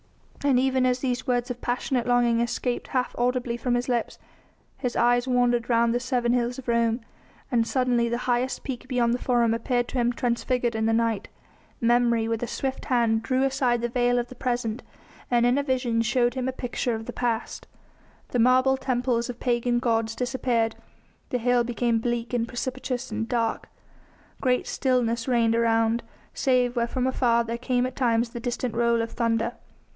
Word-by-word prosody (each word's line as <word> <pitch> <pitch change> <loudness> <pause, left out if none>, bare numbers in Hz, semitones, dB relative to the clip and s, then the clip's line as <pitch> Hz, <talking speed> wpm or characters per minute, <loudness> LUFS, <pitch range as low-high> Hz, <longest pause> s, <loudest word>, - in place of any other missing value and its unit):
And 275 -3 +4
even 260 -1 +2
as 250 0 +2
these 255 -1 -2
words 245 0 0
of 245 - -7
passionate 245 0 -1
longing 240 -1 +3
escaped 240 +1 -2
half 255 -1 -1
audibly 245 -1 0
from 245 +1 0
his 245 0 -1
lips 240 -2 -1 0.6
his 250 -3 -2
eyes 245 +1 +3
wandered 245 -1 +2
round 235 0 +3
the 245 - +1
seven 245 -1 0
hills 245 0 0
of 265 - -9
Rome, 235 0 +1 0.5
and 230 -2 +2
suddenly 245 -2 +1
the 235 - -1
highest 250 +1 0
peak 255 -1 -6
beyond 245 -2 +1
the 245 - -1
Forum 240 -3 +2
appeared 245 +1 0
to 260 - -2
him 240 0 +2
transfigured 240 0 -1
in 220 0 0
the 225 - +2
night. 225 -2 0 0.5
Memory 235 -1 +2
with 225 -1 -2
a 240 - -2
swift 265 +1 -3
hand 230 -3 +2
drew 255 +3 0
aside 260 -3 +1
the 240 - 0
veil 245 0 +2
of 240 0 -1
the - - -9
present 240 -2 -2 0.5
and 240 -1 +3
in 245 +3 +3
a - - 0
vision 250 -4 0
showed 240 +1 +1
him 260 0 -2
a - - 0
picture 245 -1 -2
of 225 0 -6
the - - -6
past. 235 -2 -2 0.6
The 245 - -1
marble 255 +2 +4
temples 245 -2 -1
of 245 - -6
pagan 240 -1 +1
gods 225 -2 0
disappeared, 245 -3 0 0.5
the 250 - 0
hill 245 0 +2
became 235 -1 0
bleak 240 +1 -2
and 235 -1 0
precipitous 255 +1 -4
and 220 +1 -3
dark; 230 -2 -1 0.7
great 250 -2 +1
stillness 240 -3 0
reigned 230 -3 +2
around, 230 0 +2 0.3
save 250 -2 +1
where 235 -1 +1
from 255 +1 -1
afar 240 -2 +2
there 230 0 -4
came 250 0 0
at 255 - -5
times 235 -2 +1
the 235 - -7
distant 240 0 -3
roll 235 0 +2
of 230 - -5
thunder. 230 0 0
240 Hz, 185 wpm, -25 LUFS, 235-250 Hz, 0.7 s, And